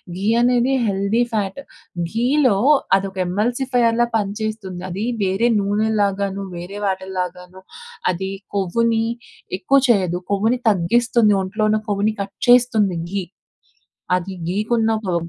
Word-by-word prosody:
ఘీ 190 Hz, +2 st, -4 dB
అనేది 245 Hz, +1 st, +3 dB
healthy 200 Hz, +3 st, +1 dB
fat. 205 Hz, +2 st, -2 dB, 0.5 s
ఘీలో 250 Hz, 0 st, +2 dB, 0.4 s
అదొక 195 Hz, 0 st, -2 dB
ఎమ్మెల్సిఫైర్‌లా 240 Hz, +4 st, +1 dB
పనిచేస్తుంది. 210 Hz, -3 st, -3 dB
అది 190 Hz, +4 st, -4 dB, 0.2 s
వేరే 195 Hz, +4 st, +1 dB
నూనెల్లాగాను, 200 Hz, -1 st, 0 dB
వేరే 175 Hz, +4 st, -7 dB
వాటిల్లాగాను, 185 Hz, -1 st, -4 dB, 0.5 s
అది 190 Hz, +2 st, -4 dB, 0.2 s
కొవ్వుని 225 Hz, +4 st, +1 dB, 0.6 s
ఎక్కువ 275 Hz, +6 st, +3 dB
చెయ్యదు, 185 Hz, -6 st, +2 dB
కొవ్వుని 220 Hz, +5 st, +1 dB
తగ్గిస్తుంది. 215 Hz, +3 st, +3 dB
ఒంట్లో 210 Hz, +3 st, -1 dB
ఉన్న 215 Hz, -, +2 dB
కొవ్వుని 205 Hz, +2 st, +1 dB
కట్ 200 Hz, 0 st, -6 dB
చేస్తుంది 230 Hz, -7 st, +4 dB
ఘీ. 200 Hz, -1 st, -1 dB, 1.0 s
అది 185 Hz, +2 st, -7 dB, 0.2 s
ఘీకున్న 220 Hz, +3 st, +1 dB, 0.2 s
పవర్. 170 Hz, -2 st, -1 dB
205 Hz, 110 wpm, -20 LUFS, 190-230 Hz, 1.0 s, చేస్తుంది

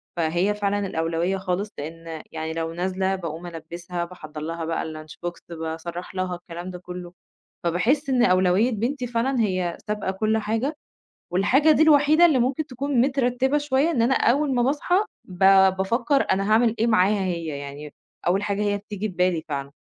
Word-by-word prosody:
فهي 175 Hz, +5 st, +1 dB
فعلًا 205 Hz, -1 st, -1 dB
الأولويّة 165 Hz, +3 st, -1 dB
خالص، 190 Hz, +2 st, -2 dB
لإن 165 Hz, +1 st, -7 dB
يعني 160 Hz, 0 st, -4 dB
لو 165 Hz, 0 st, -3 dB
نازلة 190 Hz, +2 st, -1 dB
باقوم 170 Hz, -1 st, -6 dB
البِّسها، 170 Hz, +1 st, -5 dB
باحضر 155 Hz, -4 st, -9 dB
لها 165 Hz, +1 st, -4 dB
بقى 165 Hz, -, -2 dB
الlunch 155 Hz, -1 st, -8 dB
box -, -, -1 dB, 0.3 s
باسرَّح 165 Hz, +3 st, -6 dB
لها، 185 Hz, -1 st, -1 dB
الكلام 175 Hz, +1 st, -8 dB
ده 180 Hz, -, -8 dB
كلّه، 180 Hz, 0 st, -8 dB, 0.5 s
فباحس 250 Hz, -, +1 dB
إن 250 Hz, -2 st, +3 dB
أولويّة 185 Hz, +5 st, +3 dB
بنتي 245 Hz, +4 st, -2 dB
فعلًا 240 Hz, +2 st, 0 dB
هي 185 Hz, -5 st, 0 dB
سابقة 210 Hz, -2 st, -1 dB
كلّ 215 Hz, +3 st, 0 dB
حاجة 225 Hz, +8 st, -1 dB, 0.6 s
والحاجة 265 Hz, -, +4 dB
دي 315 Hz, -, +4 dB
الوحيدة 310 Hz, +2 st, +6 dB
اللي 290 Hz, -6 st, +3 dB
ممكن 265 Hz, +5 st, 0 dB
تكون 270 Hz, -1 st, -1 dB
مترتّبة 265 Hz, +1 st, +2 dB
شوية 290 Hz, +2 st, +1 dB
إن 245 Hz, -8 st, +1 dB
أنا 255 Hz, +3 st, +3 dB
أول 275 Hz, +3 st, +2 dB
ما 245 Hz, -, +2 dB
باصحى 290 Hz, +7 st, +1 dB, 0.3 s
ب 180 Hz, -1 st, -12 dB, 0.4 s
بافكر 235 Hz, +8 st, +1 dB
أنا 195 Hz, +2 st, +1 dB
هاعمل 230 Hz, 0 st, +4 dB
إيه 230 Hz, -, +2 dB
معاها 205 Hz, -2 st, +3 dB
هي 170 Hz, -3 st, -2 dB
يعني، 140 Hz, +1 st, -8 dB, 0.3 s
أول 190 Hz, +3 st, +2 dB
حاجة 205 Hz, 0 st, -1 dB
هي 205 Hz, -1 st, +1 dB
بتيجي 210 Hz, 0 st, -5 dB
في 190 Hz, -, -9 dB
بالي 180 Hz, -2 st, +1 dB
فعلًا، 140 Hz, -1 st, -4 dB
190 Hz, 170 wpm, -24 LUFS, 170-245 Hz, 0.6 s, الوحيدة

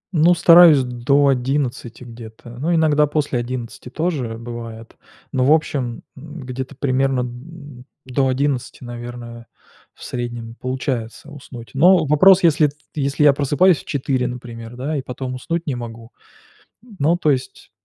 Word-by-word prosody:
Ну, 170 Hz, +3 st, +5 dB
стараюсь 165 Hz, -4 st, +7 dB
до 125 Hz, +3 st, +1 dB
11 130 Hz, -2 st, -2 dB
где-то, 115 Hz, -1 st, -12 dB
но 160 Hz, +6 st, -1 dB
иногда 150 Hz, -2 st, +3 dB
после 145 Hz, -4 st, -1 dB
11 120 Hz, 0 st, -6 dB
тоже 135 Hz, -7 st, -3 dB
бывает. 115 Hz, -1 st, -9 dB, 0.4 s
Но, 130 Hz, -2 st, 0 dB
в 135 Hz, -, +3 dB
общем, 140 Hz, -6 st, 0 dB
м, 150 Hz, +3 st, -10 dB
где-то 130 Hz, +2 st, -6 dB
примерно 135 Hz, -1 st, 0 dB
д 130 Hz, +1 st, -11 dB, 0.2 s
до 130 Hz, +1 st, 0 dB
11, 130 Hz, -1 st, -2 dB
наверное, 120 Hz, -1 st, -9 dB, 0.5 s
в -, -, -15 dB
среднем 120 Hz, -2 st, -5 dB
получается 130 Hz, +1 st, -4 dB
уснуть. 125 Hz, -5 st, -11 dB
Но 175 Hz, +4 st, +5 dB
вопрос, 180 Hz, +6 st, +5 dB
если 155 Hz, -2 st, +4 dB
т 145 Hz, -, -10 dB, 0.2 s
если 140 Hz, 0 st, -1 dB
я 145 Hz, -1 st, +7 dB
просыпаюсь 145 Hz, +5 st, +3 dB
в -, -, -14 dB
4, 130 Hz, -2 st, -1 dB
например, 120 Hz, -1 st, -8 dB
да, 140 Hz, +5 st, -3 dB
и -, -, -2 dB
потом 130 Hz, 0 st, -6 dB
уснуть 165 Hz, +6 st, -4 dB
не 145 Hz, -, -2 dB
могу. 115 Hz, -1 st, -9 dB, 0.9 s
Но, 155 Hz, +5 st, +3 dB
то 155 Hz, -4 st, +2 dB
есть, 130 Hz, -2 st, -4 dB
130 Hz, 150 wpm, -20 LUFS, 120-150 Hz, 0.9 s, стараюсь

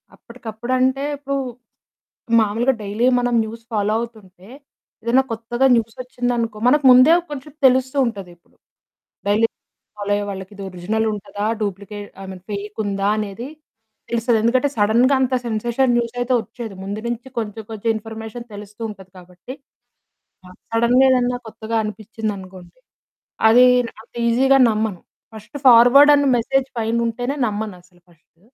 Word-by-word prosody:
అప్పటికప్పుడంటే 255 Hz, +3 st, -2 dB
ఇప్పుడు, 275 Hz, 0 st, -4 dB, 1.0 s
మామూలుగా 225 Hz, +5 st, +1 dB
డైలీ 210 Hz, +4 st, -1 dB
మనం 245 Hz, 0 st, 0 dB
న్యూస్ 225 Hz, +1 st, -8 dB
ఫాలో 210 Hz, 0 st, 0 dB
అవుతుంటే, 200 Hz, -5 st, -10 dB, 0.6 s
ఏదైనా 250 Hz, +3 st, +3 dB
కొత్తగా 235 Hz, +3 st, -1 dB
న్యూసొచ్చిందనుకో 235 Hz, -1 st, -2 dB
మనకు 295 Hz, +3 st, +4 dB
ముందే 255 Hz, +6 st, +7 dB, 0.2 s
కొంచెం 290 Hz, +1 st, -7 dB
తెలుస్తు 260 Hz, +1 st, +3 dB
ఉంటది 200 Hz, -6 st, -5 dB
ఇప్పుడు. 170 Hz, -, -34 dB, 0.7 s
డైలీ 215 Hz, +3 st, +3 dB, 0.5 s
ఫాలో 205 Hz, 0 st, -3 dB
అయ్యే 205 Hz, -, -2 dB
వాళ్ళకి 190 Hz, 0 st, -7 dB
ఇది 200 Hz, -, -8 dB
ఒరిజినల్ 195 Hz, +5 st, -2 dB
ఉంటదా? 205 Hz, 0 st, -5 dB, 0.2 s
డూప్లికేట్ 205 Hz, 0 st, -5 dB
ఐ -, -, -8 dB
మీన్ 185 Hz, -1 st, -11 dB
ఫేక్ 205 Hz, +1 st, -6 dB
ఉందా? 200 Hz, 0 st, -1 dB
అనేది 215 Hz, +3 st, -5 dB, 0.6 s
తెలుస్తది. 235 Hz, 0 st, +1 dB
ఎందుకంటే 255 Hz, +4 st, +2 dB
సడెన్‌గా 235 Hz, +6 st, +3 dB
అంత 260 Hz, 0 st, 0 dB
సెన్సేషన్ 235 Hz, +3 st, 0 dB
న్యూసయితే 245 Hz, +2 st, -1 dB
ఒచ్చేయదు. 225 Hz, -2 st, -9 dB
ముందు 200 Hz, +2 st, -5 dB
నుంచి 240 Hz, +2 st, -4 dB
కొంచెం 220 Hz, 0 st, -5 dB
కొంచెం 220 Hz, +1 st, -3 dB
ఇన్ఫర్మేషన్ 220 Hz, +2 st, -7 dB
తెలుస్తూ 210 Hz, +2 st, -11 dB
ఉంటది 190 Hz, -3 st, -12 dB
కాబట్టి 180 Hz, +7 st, -11 dB, 0.9 s
ఆహ్, 180 Hz, -, -15 dB, 0.2 s
సడెన్‌గా 235 Hz, +3 st, +4 dB
ఏదన్న 250 Hz, -1 st, +2 dB
కొత్తగా 220 Hz, +1 st, -5 dB
అనిపిచ్చిందనుకోండి, 205 Hz, -3 st, -7 dB, 0.7 s
అది 245 Hz, +3 st, +7 dB, 0.4 s
అంత 230 Hz, -, -27 dB
ఈజీగా 265 Hz, +3 st, +4 dB
నమ్మను. 215 Hz, -4 st, -2 dB, 0.3 s
ఫస్టు 220 Hz, +7 st, -10 dB
ఫార్వర్డ్ 250 Hz, +4 st, +8 dB
అనే 285 Hz, -1 st, +2 dB
మెసేజ్ 270 Hz, +3 st, 0 dB
పైనుంటేనే 235 Hz, +3 st, -1 dB
నమ్మనసలు 185 Hz, -4 st, -6 dB
ఫస్టు. 165 Hz, 0 st, -29 dB
225 Hz, 130 wpm, -20 LUFS, 205-245 Hz, 1.0 s, ఫార్వర్డ్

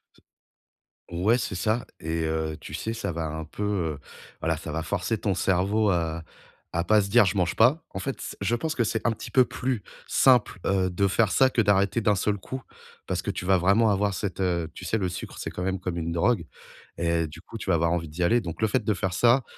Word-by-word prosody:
C -, -, -25 dB, 0.9 s
ouais, 100 Hz, +8 st, +2 dB
c'est 105 Hz, -, -3 dB
ça. 110 Hz, +7 st, 0 dB
Et 80 Hz, +1 st, -2 dB
heu, 80 Hz, -1 st, -2 dB
tu 75 Hz, -, -10 dB
sais, 110 Hz, +8 st, -3 dB
ça 105 Hz, -4 st, -3 dB
va 85 Hz, -1 st, -3 dB
un 80 Hz, +1 st, -5 dB
peu, 90 Hz, +6 st, -6 dB
heu, 85 Hz, -8 st, -1 dB, 0.4 s
voilà, -, -, 0 dB
ça 80 Hz, -, -6 dB
va 80 Hz, +2 st, -2 dB
forcer 100 Hz, +5 st, -1 dB
ton 100 Hz, -4 st, -1 dB
cerveau 100 Hz, +4 st, +2 dB
à 85 Hz, -3 st, -1 dB, 0.5 s
à 85 Hz, -, +1 dB
pas 105 Hz, +4 st, +4 dB
se 100 Hz, -, -4 dB
dire: 120 Hz, +3 st, +6 dB
«Je 95 Hz, +1 st, 0 dB
mange 90 Hz, -2 st, +1 dB
pas». 130 Hz, +9 st, +4 dB
En -, -, -5 dB
fait 135 Hz, -, -4 dB
c -, -, -6 dB
je 100 Hz, +4 st, 0 dB
pense 155 Hz, +6 st, -1 dB
que 120 Hz, -, +2 dB
c'est 110 Hz, 0 st, -1 dB
un 115 Hz, -, +2 dB
petit -, -, -9 dB
peu 130 Hz, -1 st, +5 dB
plus 125 Hz, -2 st, -2 dB, 0.3 s
simple, 125 Hz, -6 st, +4 dB
heu, 95 Hz, -1 st, +2 dB
de 100 Hz, +3 st, +1 dB
faire 100 Hz, +2 st, +2 dB
ça, 130 Hz, -1 st, +5 dB
que 125 Hz, -, +2 dB
d'arrêter 100 Hz, +1 st, +2 dB
d'un 105 Hz, -2 st, +3 dB
seul 105 Hz, +2 st, 0 dB
coup. 130 Hz, +7 st, -6 dB, 0.5 s
Parce -, -, -1 dB
que -, -, -2 dB
tu -, -, -5 dB
vas 95 Hz, 0 st, +4 dB
vraiment 100 Hz, +5 st, +4 dB
avoir 100 Hz, 0 st, +1 dB
cette, 95 Hz, 0 st, -3 dB
heu 85 Hz, -3 st, 0 dB
tu -, -, -10 dB
sais 110 Hz, -, 0 dB
le 95 Hz, -4 st, 0 dB
sucre, 90 Hz, 0 st, -6 dB
c'est -, -, -4 dB
quand 90 Hz, -, -5 dB
même 95 Hz, 0 st, -1 dB
comme 90 Hz, -1 st, -3 dB
une 85 Hz, 0 st, -2 dB
drogue 90 Hz, +3 st, +1 dB, 0.5 s
et 85 Hz, -1 st, +1 dB
du 75 Hz, +2 st, -11 dB
coup 115 Hz, -, -9 dB
tu 105 Hz, -, -6 dB
vas 90 Hz, -, +4 dB
avoir 85 Hz, +1 st, +2 dB
envie 85 Hz, -2 st, -2 dB
d'y 85 Hz, +4 st, -3 dB
aller. 120 Hz, +8 st, +3 dB
Donc 85 Hz, -2 st, -6 dB
le 110 Hz, -, +4 dB
fait 105 Hz, -, 0 dB
de 105 Hz, -, +1 dB
faire 95 Hz, 0 st, -2 dB
ça, 120 Hz, +7 st, +4 dB
95 Hz, 250 wpm, -26 LUFS, 85-110 Hz, 0.9 s, dire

